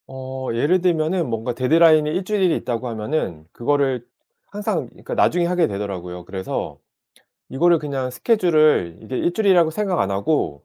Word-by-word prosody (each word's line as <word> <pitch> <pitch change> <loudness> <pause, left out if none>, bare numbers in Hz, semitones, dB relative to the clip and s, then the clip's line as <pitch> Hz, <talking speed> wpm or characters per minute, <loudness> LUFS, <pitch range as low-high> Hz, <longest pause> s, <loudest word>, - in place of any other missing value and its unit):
어 130 0 -6
예를 150 +10 +2
들면은 170 -2 +1
뭔가 115 +2 -2
데드라인이 155 +4 +4
1 180 +5 -1
주일이 190 -4 +1
있다고 120 +1 -4
하면은 105 - -3
그거를 135 -1 0 0.4
항상 205 -3 -3
그러니까 - - -9
나중에 175 0 +2
하게 175 -1 +2
되더라고요. 90 -3 -6
그래서 95 0 -5 0.7
이거를 170 +5 +3
그냥 135 -4 -3
스케줄을 155 - +2
이게 125 +4 -4
1 170 - 0
주일이라고 180 -5 +3
생각 190 +1 -1
안 100 - 0
하고 100 - -1
145 Hz, 365 characters per minute, -21 LUFS, 115-175 Hz, 0.7 s, 데드라인이